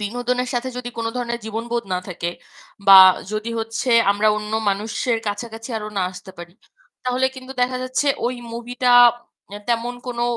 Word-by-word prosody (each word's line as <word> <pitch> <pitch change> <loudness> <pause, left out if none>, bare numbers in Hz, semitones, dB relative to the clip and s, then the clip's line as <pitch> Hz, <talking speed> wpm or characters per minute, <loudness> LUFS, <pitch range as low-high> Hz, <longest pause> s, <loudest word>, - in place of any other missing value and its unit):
বিনোদনের 245 +4 -2
সাথে 245 +1 -1
যদি 245 -1 -5
কোন 225 - -2
ধরনের 235 -1 -3
জীবনবোধ 230 +2 -3
না 180 - 0
থাকে 170 -1 -4 0.6
বা 195 -1 +11 0.3
যদি 215 +2 -3
হচ্ছে 225 +3 -3 0.2
আমরা 205 +2 +2
অন্য 210 0 -5 0.2
মানুষের 220 +4 -1
কাছাকাছি 225 +3 -5
আরো 210 - -6
না - - +1
আসতে 185 +1 -11
পারি 175 0 -10 0.5
তাহলে, 255 +1 +1
কিন্তু 260 0 -9
দেখা 255 +1 0
যাচ্ছে 255 +3 -1 0.2
ওই 250 - -1 0.2
মুভিটা 245 +1 -1 0.6
অ্যা 205 +1 -8
তেমন 240 +1 -1
কোনো 240 -1 -3
235 Hz, 160 wpm, -21 LUFS, 210-245 Hz, 0.6 s, বা